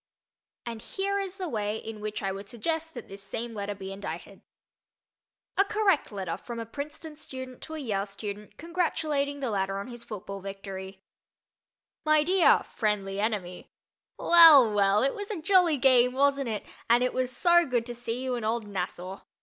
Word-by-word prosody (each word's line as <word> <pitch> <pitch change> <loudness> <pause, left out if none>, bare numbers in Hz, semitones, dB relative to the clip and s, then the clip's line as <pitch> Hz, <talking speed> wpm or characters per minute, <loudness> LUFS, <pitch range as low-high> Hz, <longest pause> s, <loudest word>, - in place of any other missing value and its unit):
And 230 -2 -6
here 400 - -2
is 390 -1 -4
the 370 -2 -3
way 210 -5 -2
in 220 -1 -8
which 210 0 -4
I 195 - 0
would 195 +1 -7
suggest 320 +7 -3
that 240 - -8
this 195 +1 -9
same 230 +4 -5
letter 205 -1 -4
be 195 0 -7
indited. 195 +1 -7 1.2
A 390 - +6
Correct 400 - +1
Letter 185 -5 -4
from 235 +4 -8
a 230 - -4
Princeton 300 +5 -7
Student 260 -4 -9
to 315 - -7
a - - -4
Yale 210 -8 -2
Student 205 +1 -7
Congratulating 305 -4 -1
the 260 -4 -1
Latter 195 -1 -1
on 200 +5 -5
His 240 -1 -8
Football 200 -3 -7
Victory 195 0 -8 1.0
MY 310 -1 +4
DEAR 365 +2 +4
"FRIENDLY 200 -3 -2
ENEMY": 200 -5 -2 0.5
Well, 310 -10 +8
well, 200 +1 +4
it 275 - +2
was 410 0 -6
a 415 -6 -3
jolly 350 -2 +4
game, 250 -2 +5
wasn't 275 -1 +2
it, 215 -2 -3 0.2
and 240 +2 +5
it 250 - 0
was 255 -1 0
so 345 +6 +5
good 240 -3 0
to 240 - -5
see 240 +1 -4
you 260 -1 -1
in 240 -2 -3
"Old 225 +1 0
Nassau." 185 -1 -5
235 Hz, 180 wpm, -28 LUFS, 200-300 Hz, 1.2 s, Well